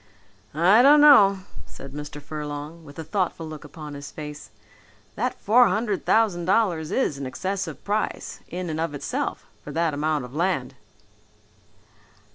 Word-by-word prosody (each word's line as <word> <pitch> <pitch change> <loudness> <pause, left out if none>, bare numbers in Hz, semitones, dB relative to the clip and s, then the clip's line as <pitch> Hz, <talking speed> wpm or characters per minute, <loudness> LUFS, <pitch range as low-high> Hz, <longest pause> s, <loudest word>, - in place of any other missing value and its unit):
"I 185 +8 +6
don't 290 +3 +7
know," 205 -10 +7 0.3
said 135 0 -11
Mr. 145 0 -7
Furlong 150 +2 -7
with 145 -2 -14
a 160 - -5
thoughtful 180 -3 -2
look 155 -1 -9
upon 150 0 -9
his 140 0 -8
face, 150 -7 -9 0.6
"that 250 +4 -2
four 240 +4 +5
hundred 210 -3 -1
thousand 200 -7 +2
dollars 180 -6 +1
is 150 - 0
an 135 - -4
excessive 190 +9 -4
price, 210 +1 -3
in 175 0 -5
and 155 - -3
of 165 -2 -2
itself, 145 - -3 0.2
for - - -8
that 165 -2 0
amount 150 -2 -1
of 125 - -12
land." 160 -6 -1
165 Hz, 150 wpm, -24 LUFS, 150-200 Hz, 0.6 s, don't